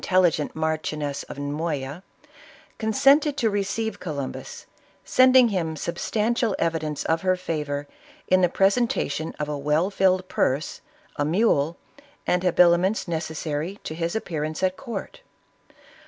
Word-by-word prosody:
telligent 180 Hz, -5 st, +2 dB
Marchioness 155 Hz, -2 st, -2 dB
of -, -, -7 dB
Moya, 145 Hz, +1 st, -3 dB, 0.8 s
consented 275 Hz, +7 st, +3 dB
to 225 Hz, -5 st, +1 dB
receive 205 Hz, +3 st, -2 dB
Co 165 Hz, -4 st, -5 dB
lumbus, 310 Hz, -, -6 dB, 0.4 s
sending 255 Hz, -1 st, +6 dB
him 170 Hz, -6 st, -1 dB
substantial 215 Hz, -, -1 dB
evidence 160 Hz, -3 st, -1 dB
of 160 Hz, 0 st, +1 dB
her 185 Hz, -1 st, +2 dB
favor 150 Hz, -5 st, -3 dB, 0.4 s
in 185 Hz, 0 st, +4 dB
the 180 Hz, -, +4 dB
presentation 195 Hz, -, +1 dB
of 150 Hz, -, -2 dB
a 150 Hz, -, -2 dB
well 150 Hz, +6 st, +1 dB
filled 185 Hz, -1 st, +2 dB
purse, 140 Hz, 0 st, -1 dB, 0.4 s
a 145 Hz, -, +1 dB
mule, 165 Hz, -2 st, +2 dB, 0.5 s
and 180 Hz, -, +1 dB
habiliments 180 Hz, +3 st, +3 dB
necessary 160 Hz, +2 st, -3 dB
to -, -, -5 dB
his 165 Hz, +3 st, -2 dB
appearance 155 Hz, -5 st, -3 dB
at 185 Hz, 0 st, +2 dB
court. 235 Hz, -, -7 dB
170 Hz, 125 wpm, -24 LUFS, 155-200 Hz, 0.8 s, sending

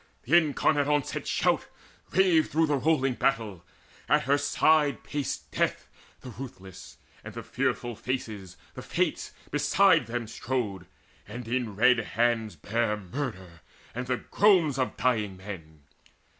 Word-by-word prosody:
The -, -, +2 dB
incarnate 150 Hz, -2 st, +3 dB
Onset 145 Hz, -2 st, -1 dB
shout -, -, +1 dB, 0.4 s
Raved 180 Hz, -4 st, +3 dB
through 160 Hz, +1 st, +2 dB
the 150 Hz, -2 st, +1 dB
rolling 135 Hz, -2 st, +2 dB
battle; 110 Hz, -9 st, -1 dB, 0.5 s
at -, -, +4 dB
her 140 Hz, +4 st, +3 dB
side 145 Hz, 0 st, +2 dB
Paced 145 Hz, -2 st, -4 dB
Death -, -, -1 dB, 0.3 s
the 125 Hz, -, -9 dB
ruthless, 95 Hz, -, -10 dB, 0.3 s
and -, -, -9 dB
the -, -, -6 dB
Fearful 120 Hz, -1 st, -2 dB
Faces, 110 Hz, -6 st, -5 dB, 0.2 s
The -, -, -8 dB
Fates, -, -, -1 dB, 0.2 s
beside -, -, +4 dB
them 120 Hz, 0 st, -3 dB
strode, 105 Hz, -6 st, -3 dB, 0.4 s
and 115 Hz, +3 st, -8 dB
in 120 Hz, -3 st, -2 dB
red 125 Hz, +3 st, +5 dB
hands 115 Hz, -2 st, 0 dB
Bare 105 Hz, +6 st, -1 dB
murder 95 Hz, -, -6 dB, 0.3 s
and 125 Hz, +2 st, -4 dB
the 125 Hz, 0 st, 0 dB
groans 175 Hz, -9 st, +3 dB
of 130 Hz, -, -1 dB
dying 105 Hz, -7 st, 0 dB
men. 80 Hz, -6 st, -10 dB
120 Hz, 135 wpm, -28 LUFS, 105-140 Hz, 0.5 s, red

